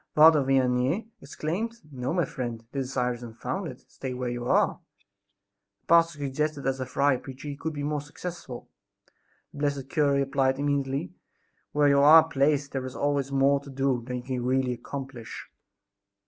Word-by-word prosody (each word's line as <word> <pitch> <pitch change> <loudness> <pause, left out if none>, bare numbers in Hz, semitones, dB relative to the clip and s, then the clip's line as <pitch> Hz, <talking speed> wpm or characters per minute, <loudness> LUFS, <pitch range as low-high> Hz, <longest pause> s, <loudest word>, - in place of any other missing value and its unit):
Father 155 -1 +8
Vianney 135 - +1
exclaimed: 175 +11 -3 0.2
"No, 130 0 -3
my 175 -1 +1
friend, 120 -4 -5
this 135 -2 -2
desire 125 -2 0
is 120 - -10
unfounded; 125 - -5
stay 130 -2 -6
where 125 -1 -2
you 120 0 -4
are." - - +2 1.0
The - - -45
pastor 165 -1 +4
suggested 145 +1 -2
that 135 - 0
as 135 0 -2
a 130 - -3
friar 140 0 +2
preacher 135 +2 -9
he 140 - -4
could 160 +2 -4
be 145 -1 -4
more 150 0 -1
successful. 145 -4 -8 0.9
The - - -9
blessed 140 -2 -1
cure 145 -3 +2
replied 135 -1 +1
immediately: 140 -6 -1 0.6
"Where 145 0 +3
you 140 0 +5
are 155 +3 +8
placed 140 -1 +1
there 135 -1 -3
is 130 - -9
always 140 -1 0
more 140 +1 +3
to 140 0 -13
do 135 -2 0
than 125 +1 -5
you 120 - -6
can 125 -1 -3
really 130 0 +1
accomplish!" 130 -1 -7
140 Hz, 175 wpm, -27 LUFS, 130-145 Hz, 1.0 s, Father